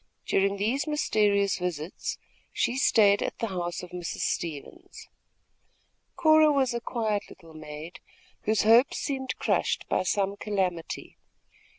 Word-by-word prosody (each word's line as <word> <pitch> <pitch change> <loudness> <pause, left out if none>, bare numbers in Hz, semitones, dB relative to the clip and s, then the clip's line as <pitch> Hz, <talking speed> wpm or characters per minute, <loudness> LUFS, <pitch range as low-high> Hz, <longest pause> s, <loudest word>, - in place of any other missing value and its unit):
During 195 +1 +1
these 240 +9 0
mysterious 205 -10 +1
visits, 175 -2 -4 0.3
she 240 - 0
stayed 205 -6 +4
at - - -3
the 230 - -2
house 175 -2 -4
of 180 - -10
Mrs. 175 -1 -5
Stevens. 155 -5 -5 1.1
Cora 310 -1 +5
was 265 -3 +1
a 235 - -3
quiet 220 -4 -2
little 165 -3 -15
maid, 155 +2 -9 0.5
whose 215 0 +2
hopes 230 +5 +5
seemed 265 -2 -3
crushed - - 0
by - - +2
some 195 +2 0
calamity. 185 -6 -3
200 Hz, 125 wpm, -27 LUFS, 180-240 Hz, 1.1 s, Cora